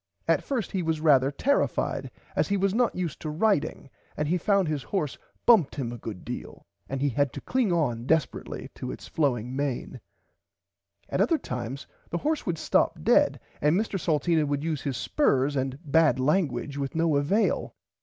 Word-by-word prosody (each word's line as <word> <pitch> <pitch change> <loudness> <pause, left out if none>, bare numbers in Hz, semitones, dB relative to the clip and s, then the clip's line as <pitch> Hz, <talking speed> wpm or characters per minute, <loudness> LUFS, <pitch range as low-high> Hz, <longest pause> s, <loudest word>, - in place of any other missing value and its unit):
At - - +3
first 245 -9 -2
he 190 - -1
was 160 -2 -1
rarther 140 -4 +4
terrified 280 +1 0 0.3
as - - +2
he 200 - +1
was 195 0 +1
not 240 +1 +2
used 175 -4 -3
to 155 - -4
riding 160 -3 0 0.3
and 150 - 0
he 180 +3 +1
found 195 0 +2
his 150 -2 -1
horse 155 -6 -2 0.3
bumped 210 - +5
him 125 -5 -3
a 120 - -7
good 105 -5 -7
deal - - -7 0.2
and 135 - -2
he 145 +1 +2
had 140 +1 +1
to - - -6
cling 250 -6 +1
on 125 -8 0
desperatly 155 -4 -1
to - - -5
its - - -9
flowing 125 -5 0
main. 140 -2 -3 1.1
At - - 0
other 330 - +3
times 125 - -5 0.2
the 170 - -1
horse 305 - -1
would 170 -2 0
stop - - +1
dead - - +4 0.2
and 150 +6 +3
Mr 210 -3 -2
Salteena 160 -1 +1
would 145 0 -1
use 155 -3 -2
his 135 -4 -3
spurs 140 - +1
and 135 0 -1
bad 150 -3 +4
languige 140 -2 0
with 140 0 -3
no 165 -2 +2
avail. 155 +11 +1
150 Hz, 185 wpm, -27 LUFS, 135-180 Hz, 1.1 s, bumped